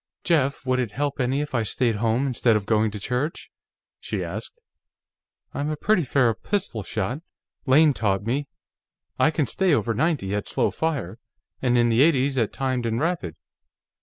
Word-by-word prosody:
"Jeff, 140 -5 +1
would 130 0 +1
it 125 -3 -1
help 145 +6 -3
any 130 +3 +1
if 150 -1 -5
I 120 - +2
stayed 115 +1 0
home, 115 +4 +1
instead 120 -3 +2
of 105 -2 -1
going 110 0 +2
to 105 0 -7
church?" 125 +9 -3 0.5
she - - -3
asked. 480 - -7 0.9
"I'm 145 +1 -2
a 155 - -1
pretty 210 +3 +2
fair 130 -5 +2
pistol 195 - -3
shot. 105 +7 -3 0.5
Lane 145 +3 +6
taught 100 -5 0
me. 135 +6 -1 0.7
I - - +5
can 155 -2 0
stay 175 +7 +2
over 115 -4 0
ninety 135 - 0
at 105 0 -2
slow - - 0
fire, 130 - -3 0.4
and 125 -1 +2
in 120 0 +4
the 115 +2 +3
eighties 140 -3 +3
at 115 - 0
timed 130 -3 -1
and 115 +1 -1
rapid. 165 - -2
130 Hz, 175 wpm, -24 LUFS, 115-145 Hz, 0.9 s, Lane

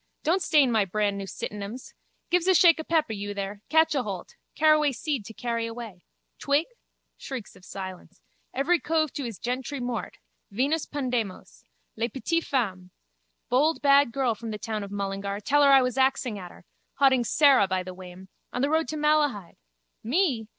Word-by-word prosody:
Don't 345 +5 +2
stain 295 -7 +4
my 220 -3 +3
brandnew 200 0 -1
sitinems. 210 +6 -7 0.4
Give's 355 0 +2
a 375 - +5
shake 335 -2 +6
of 315 - -6
peppe, 315 -9 +1
you 205 0 -5
there. 200 +1 -5
Catch 320 +1 +4
aholt. 210 -10 -4 0.2
Caraway 305 -2 +4
seed 270 -4 -3
to 225 - -9
carry 230 -2 -2
away. 225 -5 -8 0.4
Twig? 285 +3 +2 0.5
Shrieks 255 -7 -7
of - - -18
silence. 185 -1 -9 0.3
Every 320 +7 +1
cove 315 -2 0
to 285 - -4
his 230 -5 -6
gentry 255 +3 -4
mort. 245 -2 -4 0.3
Venus 275 +9 0
Pandemos. 245 -9 -4 0.3
Les 230 +1 -1
petites 330 +7 -2
femmes. 190 -9 -1 0.6
Bold 300 +6 +3
bad 280 -2 +5
girl 260 -2 0
from 225 +1 -8
the 215 - -4
town 215 0 -4
of 200 - -7
Mullingar. 200 0 -3
Tell 290 +8 +2
her 285 - +6
I 270 -1 +7
was 250 +1 -1
axing 260 -5 +1
at 180 -2 -8
her. - - -17 0.3
Hauding 265 -3 +4
Sara 265 -3 +5
by 185 -1 -1
the 185 0 -8
wame. 185 0 -11 0.2
On 250 - -2
the 285 - +1
road 320 0 +2
to 310 - -4
Malahide. 295 - +1 0.5
Me? 255 - +1
245 Hz, 175 wpm, -26 LUFS, 205-290 Hz, 0.6 s, I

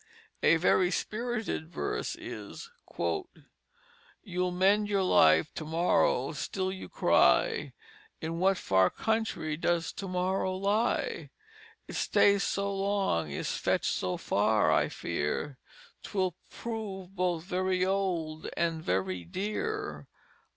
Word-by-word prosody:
A 165 - +5
very 180 +2 +3
spirited 220 -6 -3
verse 410 - -3
is: 460 - -8 0.3
"You'll 370 - -5
mend 195 +4 +3
your 200 -2 +2
life 80 - +5
to - - -5
morrow 170 - +2
still 190 -1 -2
you 190 - -8
cry. 460 -2 +3 0.5
In 165 +1 -4
what 190 +1 +3
far 95 - +3
Country 220 -8 -1
does 165 0 0
To 195 - -6
morrow 185 +1 0
lie? 205 +5 0 0.6
It - - -8
stays 200 -1 +4
so 200 0 -1
long, 195 - 0
is 70 - -3
fetch'd - - 0
so 90 -1 -2
far, - - +2
I - - +3
fear 125 - -3 0.4
'Twill 185 -3 -1 0.2
prove 200 -5 -6
both 175 -3 0
very 185 0 0
old, 175 -5 -1
and 165 -2 0
very 95 - -1
dear." 215 - -3
185 Hz, 115 wpm, -30 LUFS, 165-205 Hz, 0.6 s, A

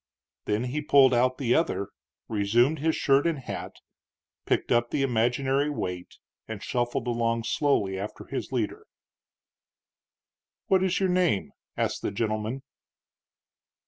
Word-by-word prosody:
Then 105 +3 0
he 130 +4 -2
pulled 140 -3 +5
out 125 +1 +2
the 125 -3 +1
other, 100 - 0 0.4
resumed 115 +8 +2
his 160 +2 +1
shirt 140 +3 +3
and 165 -2 0
hat, 135 - -6 0.7
picked - - 0
up 120 0 +3
the 140 - 0
imaginary 130 +3 +1
weight, 90 -11 -5 0.3
and 110 -3 -6
shuffled 120 -1 -1
along 115 -1 0
slowly 105 -9 +1
after 105 +2 -6
his - - -5
leader. - - -3 1.8
"What 190 -1 +3
is 185 -1 +1
your 190 -1 +1
name?" 180 - +1 0.3
asked - - -1
the - - -1
gentleman. 110 +4 -2
125 Hz, 130 wpm, -27 LUFS, 110-145 Hz, 1.8 s, pulled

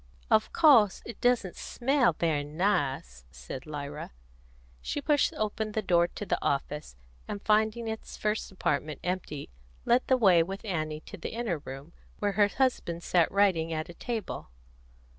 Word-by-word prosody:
"Of 215 0 +4
course 255 - +5
it 235 - -9
doesn't 245 -7 +2
smell 250 - +1
very 155 -3 0
nice," 145 - -1
said 65 - -8
Lyra. 145 0 -6 0.7
She - - -3
pushed 290 0 +2
open 215 0 -2
the 220 - -1
door 175 -2 +4
of 200 +3 -7
the - - 0
office, 140 - -2 0.3
and 205 - -4
finding 220 +2 +1
its 220 0 -6
first 210 -1 -1
apartment 150 -5 -1
empty, 180 - -4 0.3
led 245 +2 +4
the 260 - +4
way 190 -8 +6
with 195 +5 -4
Annie 155 -5 -2
to - - -10
the - - -6
inner 225 -8 -2
room, 135 +4 -9 0.2
where 205 -1 0
her 205 +1 +4
husband 205 -8 -1
sat 175 -3 +3
writing 185 -5 +2
at 155 +1 -3
a - - -8
table. 220 - -5
185 Hz, 160 wpm, -29 LUFS, 155-220 Hz, 0.7 s, way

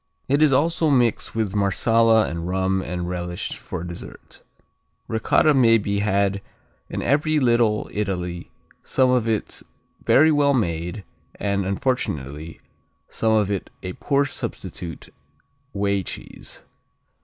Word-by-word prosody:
It 140 +3 +2
is 155 -2 +5
also 160 +4 +2
mixed 120 -6 +1
with 110 -4 -1
Marsala 110 +2 +3
and 85 +1 -4
rum 95 +1 0
and 90 -1 -4
relished 90 -1 -4
for - - -6
dessert 85 -1 -10 0.7
Ricotta 110 +7 +3
may 115 -4 +5
be 100 -1 -1
had 100 -1 +1 0.5
in - - -4
every 150 +3 +2
Little 120 -4 +2
Italy, 90 -4 -3 0.3
some 130 -1 +2
of 120 -3 +1
it 110 -2 -2 0.4
very 155 +3 +5
well 145 -2 +3
made 90 -2 -2 0.3
and, 100 -2 -1
unfortunately, 80 - -3 0.5
some 110 -1 0
of 105 -2 +2
it 100 - -3
a 90 0 -4
poor 140 +5 +1
substitute 90 -9 -6 0.6
whey 100 -1 0
cheese. - - -9
105 Hz, 125 wpm, -23 LUFS, 95-125 Hz, 0.7 s, is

